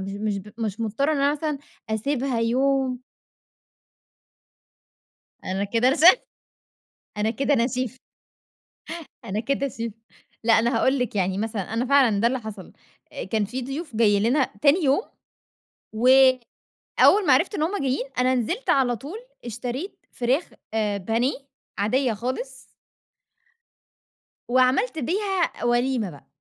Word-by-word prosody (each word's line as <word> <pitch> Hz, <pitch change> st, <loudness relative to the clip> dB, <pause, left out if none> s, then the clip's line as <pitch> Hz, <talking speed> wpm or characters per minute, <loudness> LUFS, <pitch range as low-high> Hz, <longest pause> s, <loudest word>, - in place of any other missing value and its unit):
مش 195 Hz, +1 st, -5 dB
مش 205 Hz, -1 st, -2 dB
ب 205 Hz, +2 st, -12 dB
مش 215 Hz, -1 st, -3 dB
مضطرة 230 Hz, +7 st, 0 dB
إن -, -, 0 dB
أنا 280 Hz, +1 st, +3 dB
مثلًا 300 Hz, -1 st, -3 dB, 0.3 s
أسيبها 250 Hz, +2 st, -1 dB
يوم 260 Hz, +2 st, +1 dB, 2.4 s
أنا 190 Hz, +2 st, -2 dB
كده 230 Hz, +4 st, +2 dB
ر 265 Hz, -, +3 dB
ش -, -, -4 dB, 1.2 s
أنا 210 Hz, +1 st, 0 dB
كده 275 Hz, +5 st, +1 dB
انا 235 Hz, -2 st, +2 dB
شيف. 255 Hz, 0 st, -4 dB, 1.2 s
أنا 210 Hz, -1 st, -2 dB
كده 275 Hz, +4 st, -1 dB
شيف. 230 Hz, -3 st, -5 dB, 0.5 s
لأ 230 Hz, -, +4 dB
أنا 235 Hz, +3 st, +1 dB
هاقول 265 Hz, +1 st, +2 dB
لِك، 245 Hz, -4 st, -2 dB
يعني 190 Hz, 0 st, 0 dB
مثلًا 215 Hz, -2 st, -3 dB
أنا 235 Hz, +3 st, 0 dB
فعلًا 255 Hz, -7 st, +4 dB
ده 230 Hz, -, +3 dB
اللي 260 Hz, +2 st, +1 dB
حصل. 215 Hz, -5 st, -9 dB, 0.4 s
أ -, -, -5 dB
كان 220 Hz, -2 st, 0 dB
في 250 Hz, +6 st, -5 dB
ضيوف 275 Hz, 0 st, -6 dB
جايين 205 Hz, -3 st, +3 dB
لنا 260 Hz, +5 st, +2 dB
تاني 305 Hz, +4 st, +4 dB
يوم، 275 Hz, +8 st, +3 dB, 0.9 s
وأول 255 Hz, +1 st, +3 dB, 0.6 s
ما -, -, +7 dB
عرفت -, -, +2 dB
إن 310 Hz, -, 0 dB
هم 370 Hz, +6 st, -1 dB
جايين، 265 Hz, 0 st, -1 dB
أنا 255 Hz, +1 st, +3 dB
نزلت 340 Hz, -, -2 dB
على 250 Hz, -3 st, +3 dB
طول 300 Hz, -, -8 dB, 0.3 s
اشتريت 245 Hz, -, -6 dB
فراخ 255 Hz, +7 st, 0 dB, 0.3 s
آآ 210 Hz, -2 st, 0 dB
بانيه 225 Hz, +7 st, 0 dB, 0.5 s
عاديّة 245 Hz, +4 st, +1 dB
خالص. 255 Hz, +4 st, -4 dB, 1.9 s
وعملت 255 Hz, -, +2 dB
بيها 375 Hz, -, -1 dB
وليمة 240 Hz, -3 st, +1 dB
بقى. 145 Hz, -4 st, -15 dB
250 Hz, 135 wpm, -24 LUFS, 220-275 Hz, 2.4 s, ما